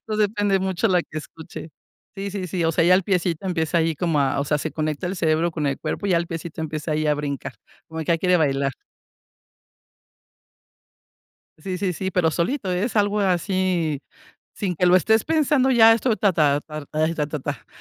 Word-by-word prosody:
Pues, 215 -1 -3
depende 205 -2 +2
mucho 190 +3 0
la 180 -2 +3
que 155 - -7
escuche. 160 +1 -10 0.5
Sí, 200 +1 -4
sí, 195 -2 -4
sí, 170 0 -1
o 165 - +2
sea, 165 - +2
ya 180 +2 +6
el 190 - +3
piecito 180 -1 -1
empieza 170 -1 0
ahí 165 0 +1
como 165 -1 0
a, 140 0 +1
o - - -1
sea, 150 +1 0
se 155 0 -4
conecta 155 +2 -2
el 185 - -3
cerebro 165 0 +1
con 155 -2 -2
el 140 -1 -1
cuerpo, - - -3
ya 185 -3 +3
el 170 - -3
piecito 165 -1 -6
empieza 155 0 -3
ahí 155 0 0
a 150 - +3
brincar, 145 -1 -4 0.3
como 160 0 -6
que 160 - -5
ya 170 -1 +2
quiere 180 +1 +3
bailar. 140 -4 +1 2.9
Sí, 180 +3 -5
sí, 190 -3 -1
sí, 190 +3 -3
pero 170 -3 +2
solito, 190 - -1
es 205 +7 -1
algo 205 0 +2
así, 180 -5 0 0.5
sin 190 -3 -2
que 180 +2 +1
lo 180 +1 +6
estés 220 +4 +3
pensando 295 -4 +2
ya, 225 -3 +7
esto, 230 0 +1
ta 200 -1 +2
ta 145 -3 +2
tar 150 -1 -8
ta 155 +2 0
tar 150 -3 -2
ta 150 - -4
ta - - -5
170 Hz, 205 wpm, -23 LUFS, 155-195 Hz, 2.9 s, ya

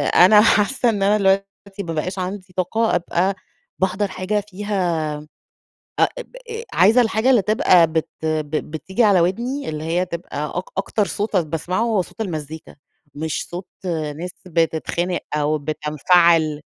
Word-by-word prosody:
أنا 210 +4 +8
حاسّة 220 +3 +3
إن 205 -3 0
أنا 205 +2 +4
الوقتي 195 0 -1
ما 165 - -4
بقاش 185 +5 -3
عندي 185 0 -5
طاقة 220 +4 +1
أبقى 180 +2 0 0.4
باحضر 190 +2 0
حاجة 195 +2 -2
فيها 180 -6 -1 0.9
أ - - +5 0.2
بأ - - -14 0.4
عايزة 215 +7 +5
الحاجة 225 +2 +2
اللي 235 -6 +5
تبقى 180 -4 +4
بت 160 0 -2 0.2
ب 155 -2 -1 0.2
بتيجي 190 - -1
على 195 -4 +5
وِدني، 240 +11 -1
اللي 155 0 -4
هي 175 +3 0
تبقى 160 -4 -5
أك 185 - -3
أكتر 200 +1 0
صوت 210 +1 -3
أنا 175 -3 +3
باسمعه، 165 +6 -2
هو 220 -5 +1
صوت 200 - -15
المزيكا، 160 -5 -6 0.4
مش 155 +1 -3
صوت 175 +1 -7 0.5
ناس 180 +3 -5 0.2
بتتخانق، 170 +1 -1
أو 150 +1 +1
بتنفَعِل. 155 +1 +2
185 Hz, 145 wpm, -21 LUFS, 160-205 Hz, 0.9 s, أنا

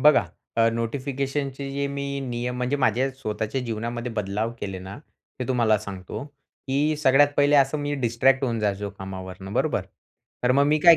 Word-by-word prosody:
बघा, 150 0 +6 0.3
अ, 115 0 +5
नोटिफिकेशनचे 135 +3 -2
जे 140 0 -1
मी 140 0 -3
नियम 125 -1 -3
म्हणजे 125 +3 0
माझ्या 130 +1 +2
स्वतःच्या 110 -1 -3
जीवनामध्ये 120 +1 -3
बदलाव 105 +2 -1
केले 95 -2 -4
ना, 95 +3 -8 0.4
ते 125 - -1
तुम्हाला 115 -4 +3
सांगतो. 100 +5 -6 0.4
की 145 +3 +2
सगळ्यात 145 0 +5
पहिले 145 +1 +5
असं 140 +2 +4
मी 145 0 -1
डिस्ट्रॅक्ट 130 +3 +3
होऊन 115 -3 0
जायचो 100 -1 -1
कामावरनं 95 0 -7
बरोबर. - - +1 0.6
तर 125 - +5
मग 140 +1 +5
मी 150 +1 +4
काय 170 -1 +9
125 Hz, 165 wpm, -25 LUFS, 110-140 Hz, 0.6 s, काय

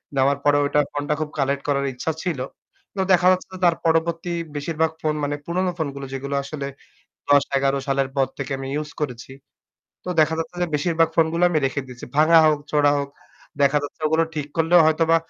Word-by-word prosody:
নেওয়ার 135 +1 +3
পরে 145 0 +4
ওইটা 145 +1 +1
phone 145 0 -3
টা - - +3
খুব 155 - -2
collect 140 0 0
করার 140 -1 +1
ইচ্ছা 125 +6 -2
ছিল। 175 -7 -2 0.6
তো 195 - -1
দেখা 180 0 +4
যাচ্ছে 185 0 -2
তার 170 -1 +4
পরবর্তী 165 +1 +1 0.2
বেশিরভাগ 160 +2 -1
phone 155 -1 0
মানে 145 0 -1
পুরনো 180 +2 -1
phone 155 -4 -2
গুলো 140 0 -6
যেগুলো 140 +1 -4
আসলে 140 0 -5 0.6
১০-১১ 140 -1 +3
সালের 135 -1 +1
পর 135 -1 +3
থেকে 140 0 -5
আমি 135 - -6 0.2
use 150 - -10
করেছি। 125 -3 -5 0.7
তো - - -7
দেখা 155 +1 +3
যাচ্ছে 165 +2 -5
যে - - +2
বেশিরভাগ 165 +2 +2
phone 160 -1 +3
গুলা 170 +1 +2
আমি 160 - +2
রেখে 135 +1 -2
দিয়েছি। 125 -1 -10
ভাঙা 160 +2 +6
হোক, 155 -1 +3
চোঁড়া 145 -1 +3
হোক, 140 0 -3 0.5
দেখা 140 +1 +4
যাচ্ছে 145 - -8
ওগুলো 160 +1 +2
ঠিক 150 -2 -3
করলেও 165 +2 +5
হয়তোবা 165 +1 +3
150 Hz, 195 wpm, -22 LUFS, 140-165 Hz, 0.7 s, ভাঙা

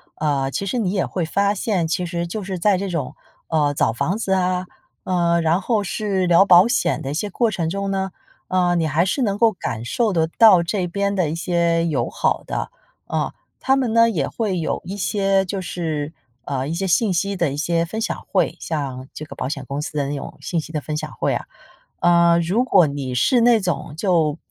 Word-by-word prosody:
呃， 140 -3 0
其 200 - -3
实 200 +6 -2
你 205 -6 0
也 195 -2 0
会 175 -3 -2
发 200 +5 +1
现， 190 -5 -1
其 180 +2 -1
实 170 0 -3
就 205 +4 -5
是 190 -1 -4
在 200 +1 +3
这 195 +1 -3
种， 165 -7 -3 0.3
呃， 150 -3 +1
找 115 - +1
房 175 - -1
子 195 -4 -3
啊， 185 -1 0 0.4
呃， 170 -2 +1
然 165 +2 +2
后 215 +1 0
是 195 -1 -1
聊 175 +3 +6
保 185 +2 +7
险 240 - 0
的 140 -2 -4
一 - - -3
些 205 +7 -2
过 230 +3 +1
程 165 -5 -2
中 200 +2 -2
呢， 190 -1 -2 0.4
呃， 180 -1 +2
你 165 -2 +1
还 160 +4 +2
是 265 - -1
能 205 -4 0
够 230 0 +4
感 115 - -5
受 220 - 0
得 160 -2 +2
到 210 -7 +7
这 180 +1 -1
边 200 +3 -1
的 180 -6 +1
一 160 - -3
些 170 -1 +1
友 140 -8 -1
好 - - 0
的， - - -3 0.4
嗯。 - - -1 0.3
他 270 0 +4
们 250 -4 0
呢 230 0 +5
也 155 -11 -1
会 205 -6 -2
有 160 - -2
一 190 +3 -6
些 195 -1 +1
就 190 +1 -3
是 160 -4 -3 0.3
呃， 135 -1 -3
一 160 - -3
些 195 +3 -2
信 190 +3 +2
息 200 +2 -1
的 170 -5 +1
一 140 - -4
些 165 +2 0
分 220 +6 -5
享 - - -3
会， - - +1
像 135 -5 -4
这 155 - -7
个 - - -10
保 - - -2
险 140 -1 -4
公 140 +1 -4
司 150 - -5
的 140 -1 0
那 145 - -3
种 - - -8
信 170 - -2
息 160 +1 -8
的 150 - -1
分 155 -1 -4
享 155 0 -4
会 - - -1
啊。 - - -3 0.5
呃， 170 -1 +4
如 185 +9 +1
果 180 -10 +4
你 140 -3 -4
是 235 - +3
那 235 -1 +5
种 175 -6 -3
就 165 -5 +1
175 Hz, 240 characters per minute, -21 LUFS, 155-200 Hz, 0.5 s, 保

